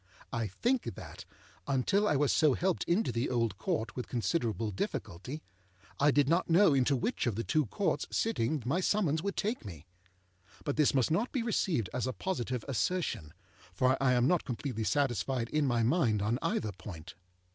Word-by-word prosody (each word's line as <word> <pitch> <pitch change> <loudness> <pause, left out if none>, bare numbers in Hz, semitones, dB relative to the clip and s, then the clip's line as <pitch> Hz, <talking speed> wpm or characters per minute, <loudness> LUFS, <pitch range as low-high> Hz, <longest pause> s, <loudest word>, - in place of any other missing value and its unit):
I 115 -2 -1
think 240 - -1
that, - - -10 0.4
until 195 +11 +2
I 150 - +2
was 140 0 +2
so 150 -5 +4
helped 185 0 0
into 180 - +1
the 115 +2 -1
Old 115 -6 0
Court 110 +5 -2
with 125 - -4
considerable 115 - -1
difficulty, 100 - -4 0.6
I 145 - +5
did 145 -1 +3
not 170 +4 +2
know 170 -1 +6
into 135 +1 +3
which 210 - -1
of 115 - 0
the 115 - -2
two 155 -2 +1
Courts 195 - -1
sitting 155 - 0
my 150 +8 +1
summons 180 -6 +1
would 200 +2 -3
take 220 +5 -1
me. 85 -7 -9 0.8
But - - -2
this 150 -2 +3
must 130 +2 +2
not 215 +10 +1
be 255 -4 -1
received 180 - 0
as 125 0 -1
a 130 - -2
positive 125 - -3
assertion, 140 - -1 0.4
for 130 +6 +3
I 130 -2 +4
am 125 0 +3
not 180 0 +2
completely 120 -3 -3
satisfied 130 -3 0
in 150 -2 +1
my 120 -2 +2
mind 115 - +2
on 115 +4 0
either 110 - -1
point. 90 -3 -9
130 Hz, 180 wpm, -31 LUFS, 115-165 Hz, 0.8 s, know